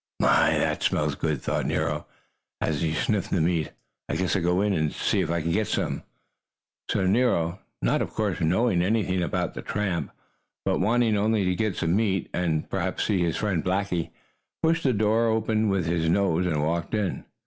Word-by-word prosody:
"My, - - +4
that - - 0
smells - - +1
good!" 75 -4 -2
thought - - -1
Nero, 75 0 -1 0.5
as 75 -3 -1
he 80 -2 +1
sniffed 100 +6 0
the 95 - +1
meat. 80 -1 +1 0.4
"I - - -1
guess 95 +3 0
I'll 95 - +1
go 90 +2 +2
in 105 -1 +1
and 80 -4 0
see - - 0
if - - -2
I 85 0 0
can't 85 +1 -1
get 110 +2 +1
some." - - -1 0.9
So 100 -3 +1
Nero, 95 -5 +2 0.2
not, - - +2
of - - -2
course, 105 -5 -1
knowing 90 +3 +2
anything 95 -2 +1
about 85 - -1
the - - -6
tramp, 100 -5 -2 0.6
but - - +1
wanting 115 +3 +2
only 105 -1 +2
to 90 - +2
get 105 0 -1
some 80 +2 0
meat 100 -4 0
and, 80 -3 0
perhaps, - - -2
see 100 -4 +1
his 85 -2 0
friend 95 -6 -1
Blackie, 95 -2 -1 0.5
pushed 165 +1 +3
the 140 - +2
kitchen 120 - +1
door 110 +2 +2
open 110 -1 +1
with 95 -3 0
his 80 -1 0
nose 90 -1 +2
and 75 -4 0
walked 85 +6 -1
in. 105 -4 -1
95 Hz, 195 wpm, -26 LUFS, 85-105 Hz, 0.9 s, My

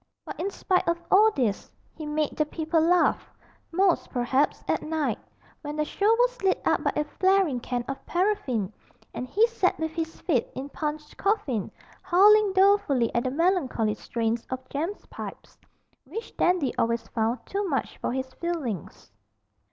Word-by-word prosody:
But - - -8
in 370 +4 -1
spite 375 -2 0
of 340 0 +1
all 425 +3 +7
this, 240 - -2 0.2
he 310 - -7
made 300 0 -1
the 305 - +2
people 320 +1 0
laugh; 350 +2 +2 0.4
most, 370 +1 +2
perhaps, 260 +4 0
at - - +1
night, 315 -1 -1 0.4
when 295 -1 -5
the 305 0 0
show 405 +7 +1
was - - +1
lit 385 -1 +2
up - - +2
by - - +2
a 300 - +1
flaring 375 -3 +2
can 245 0 -3
of 270 - -5
paraffin, 275 - 0 0.4
and 250 - -5
he 420 - +4
sat 465 -6 0
with 320 0 -2
his 325 0 -4
feet 270 -10 +1
in 270 +2 -5
Punch's 300 +1 -4
coffin, 375 - -1 0.3
howling 415 +3 +5
dolefully 380 - +3
at 235 - 0
the - - +1
melancholy 275 - +1
strains 230 +1 -2
of 260 0 -5
Jem's 330 +8 -4
pipes, - - -9 0.5
which 435 - -7
Dandy 350 -8 +1
always 230 0 0
found 230 +1 -1
too 400 +1 -2
much 275 - -2
for - - -2
his 260 +1 -4
feelings. 275 - -4
310 Hz, 165 wpm, -26 LUFS, 255-380 Hz, 0.5 s, all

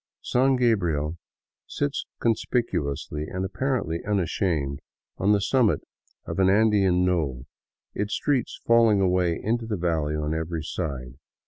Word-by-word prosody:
San 130 +2 +3
Gabriel 85 - +1 0.5
sits 145 0 -2
conspicuously, 85 - -1
and 95 +2 -3
apparently 120 - -2
unashamed, 85 -7 -1 0.4
on 100 +2 +3
the 105 - +4
summit 115 +2 +2 0.4
of 85 - -4
an 95 0 +5
Andean 100 -3 +3
knoll, 75 -9 -1 0.5
its 105 +1 -2
streets 135 -5 -1
falling 115 -3 +5
away 90 -3 +2
into 115 +1 -1
the 105 -3 -2
valley 80 -3 0
on 75 0 -1
every 80 0 -3
side. 70 -6 -5
90 Hz, 125 wpm, -25 LUFS, 80-110 Hz, 0.5 s, an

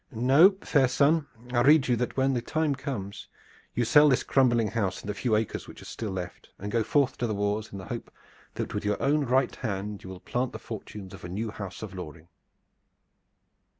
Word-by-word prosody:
No, 135 - +5
fair 135 -4 +3
son, 145 +4 +2 0.3
I 120 - +3
rede 145 +2 +5
you 125 - +3
that 125 +3 -3
when 135 0 +2
the 120 - 0
time 155 +4 0
comes 110 -8 -5 0.5
you 120 - +1
sell 150 +5 +6
this 130 - +2
crumbling 120 -5 +3
house 100 -5 -1
and - - -11
the 105 - -1
few 110 +2 0
acres 110 0 -2
which - - -11
are - - -12
still 110 - -5
left, 90 -2 -6
and 105 +2 -6
so 115 - +2
go - - +1
forth 135 +2 +1
to 120 - 0
the 110 - -2
wars 105 +1 -1
in 100 - -7
the 95 - -8
hope - - -6 0.5
that - - -4
with - - -2
your 105 0 0
own 145 +1 +2
right 130 +1 +2
hand 105 -2 -4
you 95 - -9
will 95 -1 -8
plant 125 +5 -2
the - - -5
fortunes 105 -3 -8
of - - -11
a 90 - -6
new 105 +4 -3
house 100 -1 -7
of 105 -3 -7
Loring." 85 -2 -9
115 Hz, 220 wpm, -27 LUFS, 100-135 Hz, 0.5 s, sell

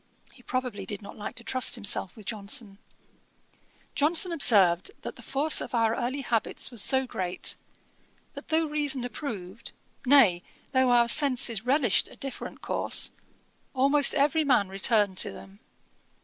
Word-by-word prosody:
He - - -19
probably 250 -6 -4
did 205 0 -6
not 200 - -11
like 210 - -8
to 235 - -12
trust 255 +2 +1
himself 205 -4 0
with 215 - -14
JOHNSON! 200 -1 -5 1.1
Johnson 330 +5 +3
observed, 195 - +3
that - - -7
the - - -14
force 295 +3 +2
of - - -6
our 225 -1 +1
early 260 +3 -3
habits 230 0 -1
was 235 -4 0
so 265 +4 +4
great, 185 -7 -3 0.8
that 280 -1 -11
though 320 0 +1
reason 295 -4 -1
approved, 220 -5 -7 0.3
nay, 245 -10 +4 0.3
though 260 -1 +2
our 240 -1 +3
senses 245 -5 +1
relished 260 -6 +1
a - - -15
different 275 -1 -8
course, - - +1 0.6
almost 280 +2 +4
every 300 +2 +1
man 250 -9 +1
returned 200 -1 0
to - - 0
them. 195 +1 -14
245 Hz, 150 wpm, -26 LUFS, 205-275 Hz, 1.1 s, so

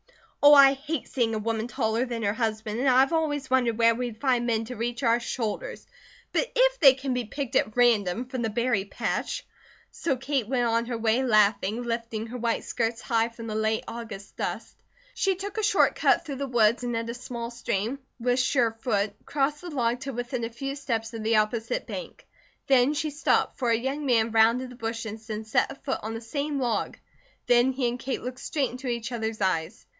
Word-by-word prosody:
"Oh, 290 0 +10
I 275 -1 +8
hate 285 +1 -4
seeing 230 -4 0
a - - -1
woman 225 +1 -2
taller 230 -2 0
than 235 -2 -4
her 200 0 +1
husband 220 -1 -2
and 265 +1 +3
I've 265 +4 +4
always 295 -4 -1
wondered 245 -4 +2
where 230 0 +5
we'd 235 -2 -4
find 245 -3 +1
men 225 -1 0
to 250 +2 -7
reach 240 +2 -3
our 235 0 +4
shoulders. 245 - -4 0.5
But - - 0
if - - +3
they 270 -4 +8
can 270 -1 -3
be 250 -1 -2
picked 275 +3 -5
at 215 +2 +1
random 230 -2 +3
from 255 -1 -5
the 225 - 0
berry 235 -2 0
patch 200 - -3 0.2
" - - -29
So 275 -6 -1
Kate 265 -3 -1
went 245 -1 +1
on 230 0 +1
her 240 -2 -2
way 225 +2 +2
laughing, 215 -1 +2
lifting 230 -2 -3
her 245 +2 -7
white 235 0 0
skirts 230 -1 -2
high 230 0 +1
from 230 0 -10
the 220 - -4
late 220 0 0
August 225 -4 -8
dust. - - -4 0.4
She 390 -1 +1
took 400 +3 -5
a - - -1
short 415 - +4
cut - - +2
through 280 -4 -5
the 275 +1 -3
woods 235 -1 +3
and 240 -1 -1
at 230 0 -3
a - - -6
small 235 -1 -6
stream, 235 +2 -2 0.2
with 245 +1 +1
sure 255 -3 +2
foot, 205 -4 0
crossed 290 +1 0
the 355 - -7
log 245 -5 0
to 275 -1 -5
within 245 0 -3
a 230 - -2
few 275 +4 -5
steps 230 -5 -3
of 225 - -5
the 225 +1 +2
opposite 220 - 0
bank. - - -8 0.4
There 265 0 +4
she 305 0 -1
stopped, 290 +3 +1
for 245 -3 +1
a 230 - +4
young 275 +4 -3
man 230 -2 +3
rounded 230 +3 +3
the - - -11
bushes 225 -1 -5
and 215 0 -4
set 220 - +1
a - - -8
foot 275 -1 -3
on 220 +1 -5
the 225 - -5
same 280 +5 -3
log; 235 -5 -1 0.5
then 245 +2 +4
he 255 -1 0
and 240 +1 -3
Kate 265 +1 -3
looked 250 +1 -5
straight 280 -4 -1
into 255 +2 -7
each 235 0 -3
other's 225 -2 -3
eyes. 185 +2 -1
240 Hz, 215 wpm, -26 LUFS, 225-265 Hz, 0.5 s, Oh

